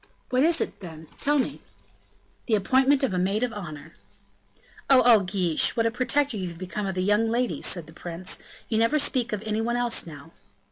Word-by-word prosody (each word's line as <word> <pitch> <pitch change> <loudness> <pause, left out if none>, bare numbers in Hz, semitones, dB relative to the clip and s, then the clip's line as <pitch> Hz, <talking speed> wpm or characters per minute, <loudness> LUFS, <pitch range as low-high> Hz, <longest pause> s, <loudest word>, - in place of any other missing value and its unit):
"What 255 0 +2
is 330 +3 +3
it, - - -3
then? 160 -4 -10
Tell 295 +1 +2
me." 265 - -1 0.9
"The 225 - +3
appointment 265 +7 +3
of 255 - +1
a 180 - 0
maid 195 +5 0
of 245 -2 -1
honor." 155 -6 -8 1.0
"Oh! 260 -2 +6
oh! 235 -3 +7
Guiche, 180 -3 +1
what 230 - +2
a 230 - +2
protector 255 +1 0
you 185 -2 -3
have 170 -1 -8
become 185 +3 -4
of 190 -1 -4
young 210 +4 +2
ladies," 240 +2 -1
said 175 -4 -2
the 160 - -15
prince, 175 +2 -4 0.3
"you 220 - 0
never 230 +7 +3
speak 255 -5 0
of 210 0 -3
any 215 0 -1
one 235 +1 -1
else 240 -6 0
now." 155 0 -11
215 Hz, 200 wpm, -25 LUFS, 180-250 Hz, 1.0 s, oh